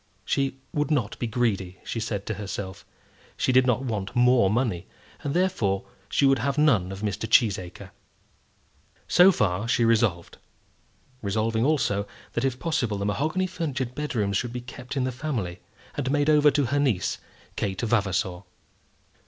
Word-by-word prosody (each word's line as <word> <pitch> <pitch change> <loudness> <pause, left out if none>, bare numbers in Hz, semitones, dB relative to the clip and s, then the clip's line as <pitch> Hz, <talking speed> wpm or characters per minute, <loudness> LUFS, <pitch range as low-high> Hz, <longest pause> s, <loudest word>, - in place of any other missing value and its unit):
She 135 +2 0 0.2
would 150 0 0
not 125 -8 0
be 120 - -1
greedy, 105 -6 -1
she 115 - -4
said 105 -3 -3
to 110 - -2
herself. 100 -2 -6 0.5
She - - +1
did 130 0 +5
not 125 +1 +2
want 105 -2 -3
more 125 -4 +5
money, 110 -6 -1 0.4
and 140 - -2
therefore 145 - +1 0.2
she 140 - +2
would 135 -1 +4
have 140 +4 -1
none 115 -12 +3
of 95 0 -7
Mr. 105 +1 -3
Cheesacre. 100 -7 +1 1.2
So 180 +2 +7
far 105 - 0
she 120 -1 +2
resolved, 110 -7 +1 0.8
resolving 110 +3 0
also 105 -9 +1 0.3
that, 115 - -1
if 130 -2 0
possible, 130 - -1
the 100 - -3
mahogany 155 - 0
furnitured 145 -9 -3
bedrooms 115 -9 -1
should 120 +1 -2
be 125 - -4
kept 125 +2 -8
in 130 - +1
the 130 - -1
family, 120 - -3 0.3
and 135 -3 -2
made 145 +2 +3
over 150 -1 +6
to 145 0 +1
her 145 - +3
niece, 130 -10 0 0.4
Kate 95 -2 -2
Vavasor. 95 -5 0
120 Hz, 160 wpm, -26 LUFS, 100-140 Hz, 1.2 s, So